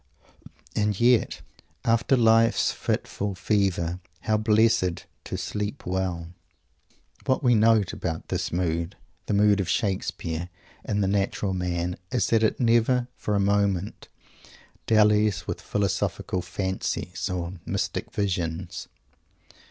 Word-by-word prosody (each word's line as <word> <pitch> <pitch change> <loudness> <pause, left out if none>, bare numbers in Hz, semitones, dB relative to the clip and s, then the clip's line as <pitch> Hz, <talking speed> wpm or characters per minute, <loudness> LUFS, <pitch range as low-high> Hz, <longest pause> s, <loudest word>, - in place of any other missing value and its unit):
and 105 -2 0
yet, 120 0 +3 0.4
"after 115 +3 +3
life's 115 0 +4
fitful 100 -1 -2
fever," 90 -3 0 0.2
how 110 - +1
blessed 110 -4 +2 0.2
to - - -5
"sleep 105 0 -4
well!" 90 -2 -2 0.9
What 130 +2 +1
we 125 -2 +5
note 110 -3 +4
about 80 -2 -4
this - - -2
mood 85 0 -1 0.3
the 105 - +1
mood 105 0 +4
of 95 - -1
Shakespeare 90 -4 -2 0.3
and 100 -1 0
the - - +1
natural 100 0 0
man 90 -1 -2
is 125 - +1
that 115 -1 +4
it 110 - +1
never 120 +1 +3
for 105 - -2
a - - +2
moment 100 -1 0 0.8
dallies 105 -4 +4
with - - -4
philosophic 100 -2 -1
fancies 95 0 -3
or 90 -1 -4
mystic - - -3
visions. 90 -1 -2
100 Hz, 120 wpm, -26 LUFS, 90-110 Hz, 0.9 s, we